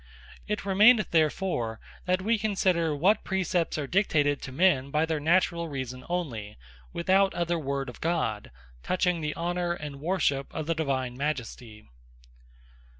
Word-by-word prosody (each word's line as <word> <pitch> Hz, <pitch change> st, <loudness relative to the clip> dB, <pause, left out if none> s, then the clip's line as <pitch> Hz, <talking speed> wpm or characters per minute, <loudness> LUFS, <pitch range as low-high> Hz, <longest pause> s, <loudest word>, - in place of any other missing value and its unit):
It 210 Hz, -1 st, -3 dB
remaineth 210 Hz, +3 st, +5 dB
therefore 155 Hz, -, 0 dB, 0.3 s
that 185 Hz, +1 st, 0 dB
we 225 Hz, +2 st, +1 dB
consider, 185 Hz, -7 st, +1 dB
what 185 Hz, +9 st, +2 dB
Praecepts 185 Hz, -4 st, -1 dB
are 150 Hz, -, -2 dB
dictated 145 Hz, -4 st, +1 dB
to 130 Hz, -, -7 dB
men, 140 Hz, -3 st, +2 dB
by 150 Hz, +3 st, +1 dB
their 160 Hz, -1 st, -1 dB
Naturall 170 Hz, +1 st, +2 dB
Reason 130 Hz, -3 st, -5 dB
onely, 125 Hz, -13 st, -4 dB, 0.3 s
without 190 Hz, +3 st, +2 dB
other 170 Hz, -1 st, 0 dB
word 140 Hz, -2 st, -3 dB
of 125 Hz, -, -10 dB
God, 155 Hz, -11 st, -1 dB, 0.3 s
touching 180 Hz, -, 0 dB
the 150 Hz, -1 st, -3 dB
Honour 175 Hz, 0 st, -1 dB
and 150 Hz, -4 st, -7 dB
Worship 150 Hz, -5 st, 0 dB
of 155 Hz, -, -3 dB
the 165 Hz, -, 0 dB
Divine 135 Hz, -6 st, -2 dB
Majesty. 125 Hz, -6 st, -5 dB
165 Hz, 145 wpm, -27 LUFS, 140-185 Hz, 0.3 s, remaineth